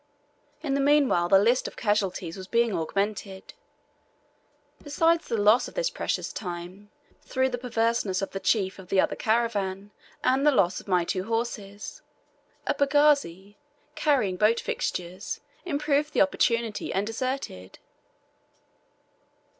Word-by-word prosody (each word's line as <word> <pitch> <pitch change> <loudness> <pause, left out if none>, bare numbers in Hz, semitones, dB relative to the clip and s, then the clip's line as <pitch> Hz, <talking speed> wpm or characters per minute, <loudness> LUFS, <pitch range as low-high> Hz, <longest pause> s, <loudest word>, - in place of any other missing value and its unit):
In 280 -3 -1
the 280 - +1
meanwhile 275 -11 +3
the 195 - +7
list 235 +6 +3
of - - -9
casualties 195 -5 -1
was 185 -1 -9
being 235 0 +2
augmented. 195 +3 -3 1.3
Besides 330 +3 +1
the 230 - -1
loss 210 +4 +4
of - - -12
this - - 0
precious - - -3
time, 180 +2 -7 0.3
through 260 0 0
the 245 -1 -4
perverseness 230 -5 0
of - - -4
the 195 - -4
chief 195 -2 0
of 185 -1 -12
the 195 - +2
other - - +2
caravan, 205 -3 -1 0.3
and 265 +2 +2
the 300 - +6
loss 185 -9 +2
of - - -22
my 180 -3 +2
two 185 +2 -2
horses, 215 -3 -4 0.6
a - - +1
pagazi 275 - +2 0.4
carrying 255 - +1
boat 215 +4 +3
fixtures 180 +2 -4 0.3
improved 300 -2 0
the - - +3
opportunity, 235 -6 0
and 195 +2 0
deserted. 225 - -4
215 Hz, 135 wpm, -26 LUFS, 190-265 Hz, 1.3 s, the